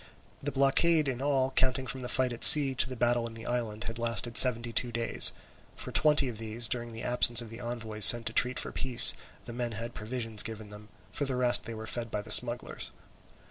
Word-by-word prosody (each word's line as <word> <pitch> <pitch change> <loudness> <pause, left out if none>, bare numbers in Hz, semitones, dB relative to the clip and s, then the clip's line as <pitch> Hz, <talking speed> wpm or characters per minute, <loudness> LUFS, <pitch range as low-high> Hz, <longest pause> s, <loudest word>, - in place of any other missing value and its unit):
The 145 - -7
blockade 145 +4 -2
in 130 -1 -7
all, 135 -2 -4
counting 130 0 -3
from 130 +1 -9
the 125 - -9
fight 130 -1 -3
at 120 - -6
sea 140 -3 +10
to 130 - -3
the 130 - -10
battle 120 0 -4
in 115 - -15
the 115 - -14
island, 115 -3 -7
had 115 0 -9
lasted 115 0 -7
seventy 120 -2 +5
two 120 +2 -3
days. 115 0 +2 0.4
For - - -9
twenty 150 -3 +1
of 115 -3 -11
these, 115 +1 -5
during 120 0 -4
the 115 0 -13
absence 120 -1 +1
of 115 -2 -9
the 115 - -14
envoys 115 -3 -4
sent 120 -1 +5
to 110 - -8
treat 125 +1 -1
for - - -7
peace, 125 -2 +3 0.3
the 120 - -12
men 120 -1 -8
had 115 +2 -10
provisions 115 -1 -6
given 110 -2 -12
them, 105 +1 -17 0.2
for 145 - -7
the 135 -1 -5
rest 125 -1 -2
they 115 - -11
were 110 0 -12
fed 115 +1 -7
by 105 - -8
the 110 - -10
smugglers. 120 +2 0
120 Hz, 225 wpm, -25 LUFS, 115-130 Hz, 0.4 s, sea